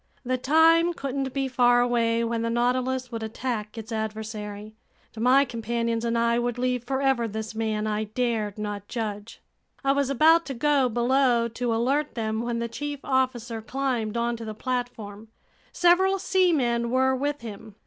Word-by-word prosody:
The 255 +1 +1
time 325 +6 +4
couldn't 270 -1 -3
be 270 0 -1
far 245 -1 +4
away 235 -1 +2
when 230 0 -1
the 230 - -1
Nautilus 250 +2 0
would 230 -1 -4
attack 220 -1 -4
its 225 +1 -7
adversary, 215 -1 -5 0.4
and 220 - -5
my 265 +3 +5
companions 230 -1 -2
and 235 0 0
I 235 0 +2
would 240 0 -2
leave 250 -1 -1
forever 265 -2 +1
this 220 +1 -5
man 220 -1 -1
I 215 0 -1
dared 220 -2 -2
not 205 -1 -5
judge. 215 -2 -5 0.4
I 275 - +3
was 280 -1 +1
about 320 +5 +4
to 270 - -4
go 275 0 +2
below 240 0 +2
to 230 0 -2
alert 275 +6 0
them, 220 -1 -2
when 235 0 -2
the 235 0 -2
chief 290 +4 -5
officer 245 -4 -1
climbed 245 -3 -2
onto 235 0 -1
the 215 -1 -6
platform. 225 -4 -4 0.4
Several 375 +2 +4
seamen 315 -12 +1
were 260 +1 +2
with 285 +2 -2
him. 215 -2 -9
240 Hz, 165 wpm, -25 LUFS, 225-265 Hz, 0.4 s, my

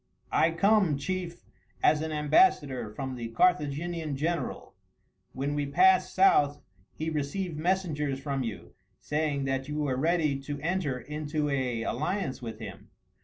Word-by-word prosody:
"I - - +4
come, 190 -2 +3
chief, 175 +2 -4 0.4
as 150 0 +4
an 160 0 -3
ambassador 150 - +3
from 130 +5 -5
the 120 -2 -5
Carthaginian 155 +2 0
general. 160 -1 -3 0.6
When 140 +2 -2
we 145 -1 -1
passed 375 - +4
south 145 - +4 0.4
he 160 +1 -3
received 155 +3 -3
messengers 155 -6 0
from 135 -1 -2
you, 95 -8 -6 0.3
saying 150 -2 -1
that 135 0 -1
you 150 0 -4
were 145 -4 0
ready 155 -1 +1
to 145 +1 -5
enter 160 -6 -1
into 150 +1 -3
an 125 -4 -1
alliance 140 - -2
with 115 -2 -6
him. - - -9
150 Hz, 140 wpm, -28 LUFS, 135-170 Hz, 0.6 s, I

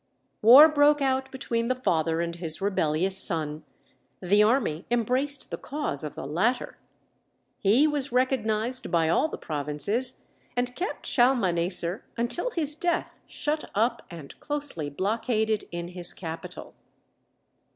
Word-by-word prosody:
War 255 +8 +10
broke 295 -1 +4
out 265 -1 0
between 235 -3 -2
the 255 - +1
father 165 -9 0
and 170 0 -4
his 165 -2 -2
rebellious 190 -2 0
son; 155 -4 -1 0.6
the 200 +3 +3
army 210 - +1
embraced 255 +4 0
the - - -4
cause 280 - -4
of 150 - -6
the - - -6
latter; 195 - -1 0.8
he 220 +9 +4
was 290 -3 -1
recognized 250 -1 0
by 165 -3 +2
all 170 - +2
the - - -7
provinces, 150 - -1 0.3
and 245 0 -1
kept 370 +3 -4
Shalmaneser 185 -7 +1
until 240 - -1
his 305 - -1
death 345 +1 -1
shut 300 +1 -3
up 230 +3 +1
and 165 -5 -11
closely 290 - -3
blockaded 220 - -1
in 170 0 -5
his 180 -1 +1
capital. 165 -2 -8
220 Hz, 130 wpm, -26 LUFS, 170-265 Hz, 0.8 s, War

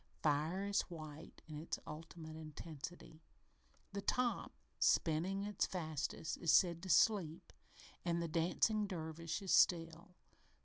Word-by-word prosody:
Fire 155 +6 +1
is 200 0 +2
white 155 -2 -9
in 150 -2 -6
its 160 - -3
ultimate 160 0 -8
intensity. 160 +1 -8 0.7
The 200 - -2
top, 245 +4 0 0.3
spinning 180 +5 +2
its 205 -1 0
fastest, 160 -2 -3
is 165 - +3
said 170 -2 +5
to 185 - -7
"sleep" 180 -5 +3 0.5
and 170 -1 0
the 170 - -1
dancing 180 +6 +2
dervish 165 0 -4
is 190 - -2
"still." 170 +1 +3
165 Hz, 125 wpm, -38 LUFS, 160-185 Hz, 0.7 s, said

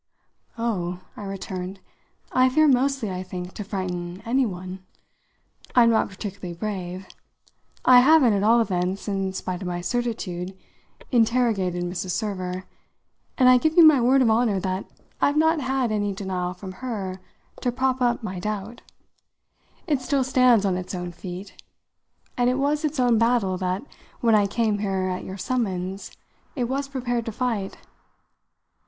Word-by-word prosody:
"Oh," 180 -6 -2
I 205 - -7
returned, 190 -1 -5 0.5
"I 255 0 +4
fear, 310 +4 +4
mostly, 265 -4 +2
I 180 0 -4
think, 180 -1 -7
to 210 - -5
frighten 180 -2 -4
any 255 +2 +2
one. 185 -1 -7 1.0
I'm 235 -2 +6
not 225 - +2
particularly 190 -2 -7
brave. 185 -2 -4 0.8
I 250 -1 +9
haven't, 265 -3 +6
at 200 - +1
all 230 +3 +5
events, 185 -2 -1
in 195 -2 -1
spite 185 -1 -4
of 185 - -4
my 175 0 -2
certitude, 190 -5 -3 0.5
interrogated 225 -7 +2
Mrs. 180 +1 -4
Server, 185 -3 -3 0.7
and 255 - +5
I 255 0 +7
give 315 +5 0
you 335 - +10
my 300 -5 +7
word 260 +2 +4
of 225 - +3
honour 220 -3 +2
that 185 +1 -2 0.4
I've 285 +1 +3
not 320 0 +3
had 260 -3 0
any 205 -1 0
denial 185 -2 -3
from 190 0 -8
her 195 -7 -4 0.4
to 245 - 0
prop 260 +1 0
up 240 -1 +1
my 185 -4 -4
doubt. 210 +4 -4 1.0
It 290 -6 0
still 270 +1 +1
stands 250 -5 +4
on 185 -2 +1
its 185 +1 -5
own 180 -1 -4
feet, 185 +2 -9 0.7
and 245 0 +2
it 250 - +1
was 290 +3 0
its 305 -2 -1
own 240 -3 +4
battle 230 -5 +2
that, 185 +3 -1 0.4
when 230 -2 +3
I 205 -2 +4
came 215 0 0
here 190 -2 -1
at 180 0 -3
your 190 - -7
summons, 195 -4 -2 0.5
it 255 - -1
was 270 +3 -2
prepared 245 -3 -2
to - - -1
fight. 220 -4 -2
210 Hz, 160 wpm, -24 LUFS, 185-250 Hz, 1.0 s, you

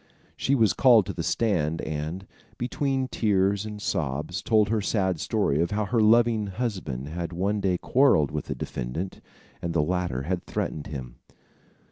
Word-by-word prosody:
She 140 - +1
was 110 -8 +4
called 120 -5 +6
to - - -4
the 85 - -4
stand 80 -5 0
and, 80 +5 -4 0.3
between 135 +1 -1
tears 100 -3 +1
and 105 -1 -7
sobs, 75 +1 -2
told 110 -1 +3
her 110 -1 +1
sad 95 -4 0
story 75 +1 +1
of 85 - +1
how 105 0 -1
her 115 +4 0
loving 115 -1 +4
husband 95 - -4
had 85 +1 -4
one 100 +5 -1
day 95 -2 +1
quarrelled 120 - +3
with - - -3
the - - -4
defendant, 70 +10 -5 0.4
and 85 -1 -3
the 75 - +3
latter 90 -6 -1
had 90 +4 -2
threatened 75 - -3
him. 65 -4 -7
95 Hz, 165 wpm, -26 LUFS, 80-110 Hz, 0.4 s, called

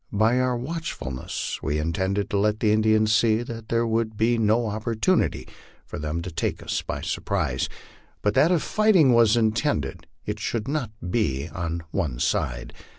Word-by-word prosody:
By 110 +5 +3
our 125 -1 +1
watchfulness 125 - -4
we 75 -1 -1
intended 95 +5 -1
to 100 - +1
let 105 +1 +1
the 105 - +2
Indians 110 0 +3
see 110 0 +3
that 115 -2 -8
there 115 0 +2
would 110 -1 -1
be 115 +2 +3
no 110 +2 +3
oppor 110 +1 -3
tunity 110 -3 +1 0.4
for - - -7
them 80 +3 -3
to 90 - -6
take 80 - -2
us - - -2
by - - -5
surprise, 65 +1 -1 0.5
but 105 - +2
that 160 +10 +4
if 175 -4 +2
fighting 195 - +4
was 115 -1 +5
intended, 110 - 0 0.2
it - - -3
should 115 0 -2
not 140 -5 -1 0.2
be 75 - 0
all 95 - -7
on 85 0 -3
one 80 -11 -1
side. - - -1
110 Hz, 175 wpm, -25 LUFS, 95-120 Hz, 0.5 s, was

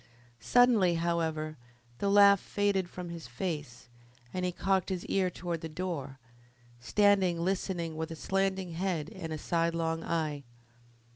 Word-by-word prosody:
Suddenly, 225 - +4
however, 160 -2 -1 0.4
the 200 - +1
laugh 200 -1 +7
faded 200 -3 0
from 180 -1 -7
his 170 -5 -7
face, 145 -3 -5 0.5
and 185 - -2
he 180 - 0
cocked 190 +1 0
his 185 -2 -3
ear 190 -2 +1
towards 170 -2 -4
the 165 - -5
door, 155 -5 -4 0.6
standing 190 - +3
listening 175 -2 -1
with 160 0 -3
a 165 - -6
slanting 190 +1 -1
head 170 -2 -2
and 170 -5 -6
a 155 - -2
sidelong 165 0 0
eye. 155 -3 -1
170 Hz, 140 wpm, -30 LUFS, 160-190 Hz, 0.6 s, laugh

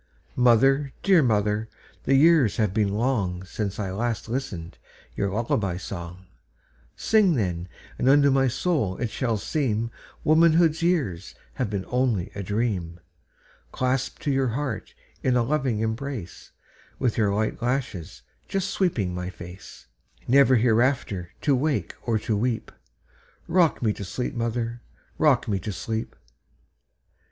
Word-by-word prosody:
Mother, 135 +3 +4
dear 190 -4 +5
mother, 105 -2 +1 0.4
the 135 - +3
years 145 -6 +5
have 105 -4 +1
been 105 -1 +2
longSince 100 -3 -2
I 100 -3 -3
last 115 +4 -2
listened 110 -9 -5 0.4
your 100 - 0
lullaby 100 -3 -1
song:Sing, 90 - -2
then, 90 -6 -2 0.3
and 130 - +3
unto 140 0 +6
my 135 0 +3
soul 130 - 0
it 120 -3 -2
shall 115 -4 -1
seemWomanhood's 155 +7 +1
years 140 - 0 0.2
have 125 -5 -2
been 100 -2 -3
only 120 -6 0
a 100 - -5
dream. 100 -5 -2 0.7
Clasped 130 +1 -1
to 145 - +1
your 135 -1 +2
heart 125 0 -4 0.3
in 130 -1 +2
a 120 - +3
loving 130 -4 0
embrace, 115 -3 -4 0.5
With 125 -4 0
your 105 -3 +2
light 110 +4 -1
lashes 120 - -3 0.2
just 195 0 -2
sweeping 120 - 0
my 90 0 -4
face, 90 +1 -11 0.4
Never 130 +1 +6
hereafter 115 -6 +1
to 145 -3 +3
wake 145 +3 -1
or 115 -2 0
to 110 0 -1
weep;—Rock 120 - -2
me 110 -2 +2
to 100 - -7
sleep, 105 +6 -3
mother,—rock 120 +4 -1
me 100 -3 0
to 105 - -4
sleep! 110 +4 -4
115 Hz, 125 wpm, -25 LUFS, 100-135 Hz, 0.7 s, unto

